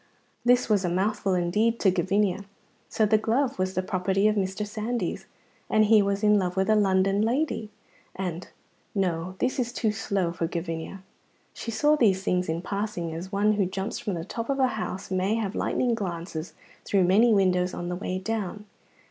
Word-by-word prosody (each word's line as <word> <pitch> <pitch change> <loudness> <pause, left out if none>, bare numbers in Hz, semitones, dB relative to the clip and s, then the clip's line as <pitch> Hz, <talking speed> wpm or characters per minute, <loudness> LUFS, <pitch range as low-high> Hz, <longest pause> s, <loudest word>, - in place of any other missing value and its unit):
This 245 +1 +4
was 210 -4 +2
a 180 - 0
mouthful 190 +1 0
indeed 210 +7 +1
to 190 - +5
Gavinia. 195 +2 0 0.4
So 220 - +2
the 215 +1 +3
glove 235 +2 0
was 185 +1 -1
the 185 - 0
property 190 +1 +1
of 215 - +2
Mr. 195 +1 -1
Sandys, 215 -1 -3 0.4
and 215 0 +4
he 215 0 +6
was 200 +1 -1
in 210 -1 +5
love 180 -1 -2
with 190 +3 +2
a - - +5
London 195 -1 +3
lady, 235 -1 0 0.5
and 180 -2 -4 0.5
no, 180 -2 -1
this 255 +5 -1
is 245 -1 -1
too 225 -3 0
slow 200 -4 -1
for 165 -1 -2
Gavinia; 165 +2 -5 0.5
she - - -6
saw 295 +6 +3
these 195 -9 +3
things 180 -3 0
in 165 +2 -2
passing, 195 -5 -3
as 175 +4 -6
one 205 +1 +2
who 200 -3 +1
jumps 190 +3 -4
from 205 -5 -3
the 165 -1 -5
top 230 +5 -5
of 275 - +1
a 260 -2 +3
house 200 -4 -5
may 190 +3 +1
have 215 -3 -2
lightning 245 +1 0
glimpses 170 -5 -5 0.3
through 195 -2 +2
many 210 +7 +5
windows 185 -3 +3
on 175 0 -4
the 180 - -2
way 185 0 -3
down. 210 0 -4
195 Hz, 190 wpm, -26 LUFS, 185-215 Hz, 0.5 s, he